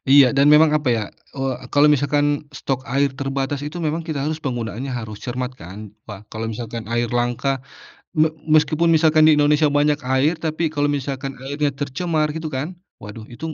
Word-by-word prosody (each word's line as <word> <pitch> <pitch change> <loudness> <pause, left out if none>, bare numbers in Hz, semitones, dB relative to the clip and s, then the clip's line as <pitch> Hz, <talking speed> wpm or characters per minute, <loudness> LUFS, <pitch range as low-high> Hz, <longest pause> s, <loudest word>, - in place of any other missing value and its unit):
Iya 140 -1 +6
dan 140 +2 +5
memang 150 0 +6
apa 145 -4 -1
ya, 115 -2 +1 0.3
eee, 135 -1 -1 0.2
kalau 145 +1 +6
misalkan 145 +1 +1 0.3
stok 135 -1 -3
air 140 -1 +1
terbatas 135 +1 -2
itu 150 +4 -5
memang 160 0 -2
kita 155 -3 -4
harus 155 +1 -1
penggunaannya 120 0 -3
harus 110 -2 -7
cermat 125 0 -3
kan, 100 +1 -10
ka 105 -1 -10
kalau 110 +1 -4
misalkan 115 0 -6
air 120 0 +1
langka 125 +2 -1 0.5
me 155 +1 +5 0.2
meskipun 155 +2 +3
misalkan 155 -1 +4
di 150 - +5
Indonesia 150 +1 +4
banyak 145 +1 +2 0.2
air 145 +5 +3
tapi 160 +1 -2
kalau 145 -1 +1
misalkan 135 -1 -3
airnya 145 +1 0
tercemar 155 +3 -1
gitu 160 0 -4
kan 150 +7 -4 0.2
waduh 110 +1 -10
itu. 155 +6 -6
140 Hz, 175 wpm, -21 LUFS, 125-150 Hz, 0.5 s, Iya